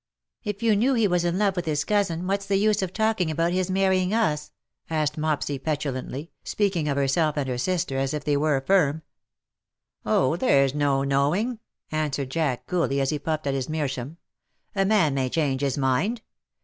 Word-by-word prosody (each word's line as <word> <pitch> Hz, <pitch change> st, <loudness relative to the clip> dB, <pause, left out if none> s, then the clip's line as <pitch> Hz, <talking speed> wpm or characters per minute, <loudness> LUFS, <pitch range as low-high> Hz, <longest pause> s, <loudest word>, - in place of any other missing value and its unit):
" -, -, -63 dB
If 210 Hz, 0 st, -4 dB
you 225 Hz, -2 st, +4 dB
knew 255 Hz, +6 st, +2 dB
he 225 Hz, -3 st, +3 dB
was 180 Hz, -2 st, +1 dB
in 175 Hz, +1 st, 0 dB
love 200 Hz, -2 st, +2 dB
with 175 Hz, -1 st, -2 dB
his 150 Hz, -1 st, 0 dB
cousin, 195 Hz, -5 st, 0 dB
what^s 195 Hz, +2 st, -1 dB
the 200 Hz, -, +1 dB
use 210 Hz, 0 st, +2 dB
of 190 Hz, -2 st, -2 dB
talking 220 Hz, -5 st, +1 dB
about 165 Hz, +2 st, 0 dB
his 185 Hz, 0 st, 0 dB
marrying 190 Hz, +1 st, +2 dB
us 150 Hz, -10 st, +1 dB
?'^ -, -, -45 dB, 0.4 s
asked 155 Hz, -2 st, 0 dB
Mopsy 150 Hz, -2 st, -1 dB
petulantly, 145 Hz, 0 st, -3 dB
speaking 190 Hz, -7 st, 0 dB
of 140 Hz, -, -1 dB
herself 150 Hz, +3 st, +1 dB
and 140 Hz, -2 st, -1 dB
her 125 Hz, -1 st, -2 dB
sister 170 Hz, -3 st, -1 dB
as 135 Hz, 0 st, 0 dB
if 150 Hz, -1 st, -3 dB
they 145 Hz, -1 st, +1 dB
were 145 Hz, 0 st, +2 dB
a -, -, -2 dB
firm. 160 Hz, -2 st, +2 dB, 0.5 s
" -, -, -65 dB, 0.2 s
Oh, 130 Hz, +8 st, +2 dB
there's 140 Hz, -, +3 dB
no 140 Hz, -2 st, +1 dB
knowing," 150 Hz, -, +1 dB, 0.3 s
answered 145 Hz, -4 st, -2 dB
Jack, 145 Hz, -5 st, -1 dB
coolly, 165 Hz, -6 st, 0 dB
as 135 Hz, 0 st, +1 dB
he 150 Hz, -, -2 dB
puffed 155 Hz, -1 st, -2 dB
at 140 Hz, -, 0 dB
his 135 Hz, 0 st, -2 dB
meerschaum. 145 Hz, -1 st, -3 dB, 0.3 s
" -, -, -45 dB
A 195 Hz, -1 st, +2 dB
man 190 Hz, -8 st, +3 dB
may 130 Hz, -2 st, 0 dB
change 140 Hz, -3 st, 0 dB
his 140 Hz, -1 st, 0 dB
mind. 150 Hz, -, 0 dB
155 Hz, 205 wpm, -25 LUFS, 140-190 Hz, 0.5 s, you